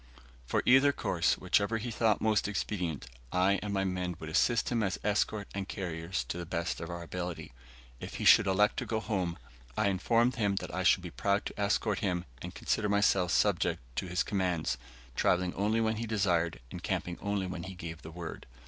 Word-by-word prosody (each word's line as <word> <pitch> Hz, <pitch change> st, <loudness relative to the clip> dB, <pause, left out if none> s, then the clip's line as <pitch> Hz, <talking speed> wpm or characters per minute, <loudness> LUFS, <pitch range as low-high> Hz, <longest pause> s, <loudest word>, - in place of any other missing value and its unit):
For -, -, +1 dB
either 135 Hz, +3 st, +6 dB
course, -, -, +1 dB
whichever 105 Hz, +2 st, +1 dB
he 120 Hz, +2 st, -4 dB
thought 110 Hz, -1 st, +2 dB
most 110 Hz, -2 st, +2 dB
expedient, 90 Hz, -8 st, -2 dB, 0.3 s
I 95 Hz, +2 st, +3 dB
and 105 Hz, -, -3 dB
my 95 Hz, -1 st, +1 dB
men 90 Hz, -2 st, -2 dB
would 80 Hz, -3 st, -7 dB
assist 115 Hz, +8 st, +2 dB
him 120 Hz, -2 st, +1 dB
as 95 Hz, -3 st, 0 dB
escort 105 Hz, 0 st, 0 dB
and 100 Hz, -1 st, -3 dB
carriers, 85 Hz, -1 st, -3 dB
to 90 Hz, -, -3 dB
the 85 Hz, -, -4 dB
best 85 Hz, 0 st, -2 dB
of 85 Hz, -, -5 dB
our 85 Hz, 0 st, -5 dB
ability. 90 Hz, +1 st, -5 dB, 0.5 s
If -, -, -7 dB
he -, -, -3 dB
should 105 Hz, -, +8 dB
elect 105 Hz, +3 st, +3 dB
to -, -, -3 dB
go 110 Hz, -, 0 dB
home, 95 Hz, -6 st, -2 dB, 0.4 s
I 105 Hz, -2 st, +3 dB
informed 115 Hz, +6 st, +2 dB
him 100 Hz, -3 st, +1 dB, 0.2 s
I 95 Hz, -, -1 dB
should 90 Hz, 0 st, +4 dB
be 90 Hz, -, -6 dB
proud 100 Hz, 0 st, 0 dB
to -, -, -6 dB
escort 105 Hz, +1 st, +1 dB
him, 90 Hz, -3 st, -1 dB, 0.2 s
and -, -, -7 dB
consider 105 Hz, -1 st, 0 dB
myself 100 Hz, -3 st, +3 dB
subject -, -, +2 dB, 0.2 s
to -, -, -1 dB
his 90 Hz, +1 st, 0 dB
commands 90 Hz, -, -1 dB, 0.4 s
travelling 90 Hz, 0 st, +2 dB
only 105 Hz, +3 st, +1 dB
when 110 Hz, -1 st, +1 dB
he 115 Hz, +1 st, -3 dB
desired, 85 Hz, -, +1 dB
and -, -, -6 dB
camping 90 Hz, -1 st, -2 dB
only 100 Hz, -2 st, -1 dB
when 90 Hz, -2 st, -5 dB
he 95 Hz, 0 st, -7 dB
gave 85 Hz, -1 st, -7 dB
the -, -, -9 dB
word. 85 Hz, -1 st, -7 dB
95 Hz, 200 wpm, -31 LUFS, 90-105 Hz, 0.5 s, should